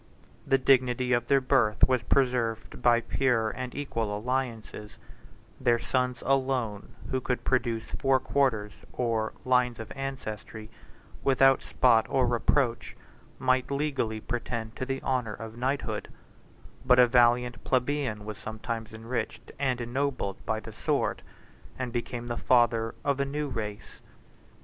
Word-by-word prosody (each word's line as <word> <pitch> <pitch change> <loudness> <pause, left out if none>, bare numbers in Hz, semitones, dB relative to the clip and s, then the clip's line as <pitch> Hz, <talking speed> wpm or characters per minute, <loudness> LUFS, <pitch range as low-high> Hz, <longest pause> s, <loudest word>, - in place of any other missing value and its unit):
The 135 - +4
dignity 130 -1 +3
of 120 0 +1
their 140 -1 +5
birth 125 -5 +3
was 130 -2 +2
preserved 120 -2 0
by 120 -1 +4
pure 115 -4 +1
and 125 0 -6
equal 115 -7 -2
alliances; 115 -3 -4 0.6
their 120 -2 +3
sons 125 0 -1
alone, 130 -6 0 0.2
who 130 - 0
could 125 0 -2
produce 120 -3 0
four 135 -1 +1
quarters 110 -9 0 0.2
or 115 -3 -1
lines 125 -2 +2
of 115 - -8
ancestry 110 -5 -6 0.5
without 135 0 +5
spot 115 -3 +3
or 130 -2 +2
reproach, 120 +1 0 0.4
might 130 -1 +1
legally 140 -6 -1
pretend 115 -1 -4
to 130 - -3
the 135 0 -3
honor 125 -5 -1
of 110 +1 -8
knighthood; 130 +4 -2 0.8
but 125 -1 +5
a 125 - +8
valiant 120 0 +3
plebeian 130 -5 0
was 105 -2 -7
sometimes 110 0 -5
enriched 115 +3 -4
and 130 -3 0
ennobled 120 -4 -2
by 110 0 0
the - - -10
sword, - - -1 0.6
and 125 -2 -4
became 120 0 -3
the 120 -1 -4
father 115 -2 +2
of 140 -1 +1
a - - +3
new 145 +2 -2
race. 105 -4 -6
125 Hz, 135 wpm, -28 LUFS, 115-130 Hz, 0.8 s, a